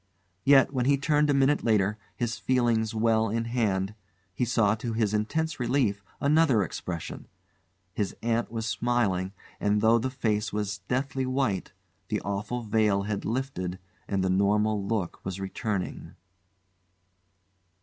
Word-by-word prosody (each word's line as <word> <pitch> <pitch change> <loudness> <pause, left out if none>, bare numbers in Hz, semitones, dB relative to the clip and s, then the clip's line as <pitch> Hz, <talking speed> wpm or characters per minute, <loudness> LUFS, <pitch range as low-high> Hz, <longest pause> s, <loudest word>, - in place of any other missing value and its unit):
Yet, 135 0 +5
when 125 -2 0
he 140 +1 +4
turned 150 +1 +2
a - - +4
minute 140 +2 +3
later, 105 -1 +2 0.2
his 120 -1 -2
feelings 120 -3 +1
well 110 0 +2
in 115 +2 -1
hand, 105 -5 0 0.4
he 120 - 0
saw 115 -3 +3
to 115 +1 -3
his 110 -2 +1
intense 145 +9 -1
relief 120 -5 +1 0.2
another 140 -7 +4
expression; 85 -1 -6 0.7
his 100 0 -2
aunt 115 -1 0
was 115 -1 -3
smiling, 105 -4 0 0.3
and 105 0 +2
though 110 +2 +4
the 130 +3 -1
face 110 -5 -1
was 105 -1 -2
deathly 130 +1 -1
white, 130 -8 -1 0.4
the - - -1
awful 105 +5 -3
veil 105 -2 +2
had 105 0 -3
lifted 110 -7 -2 0.3
and 100 -2 0
the 95 - +1
normal 105 +2 +2
look 100 -3 -2
was 95 0 -4
returning. 95 0 -4
110 Hz, 140 wpm, -27 LUFS, 100-125 Hz, 0.7 s, Yet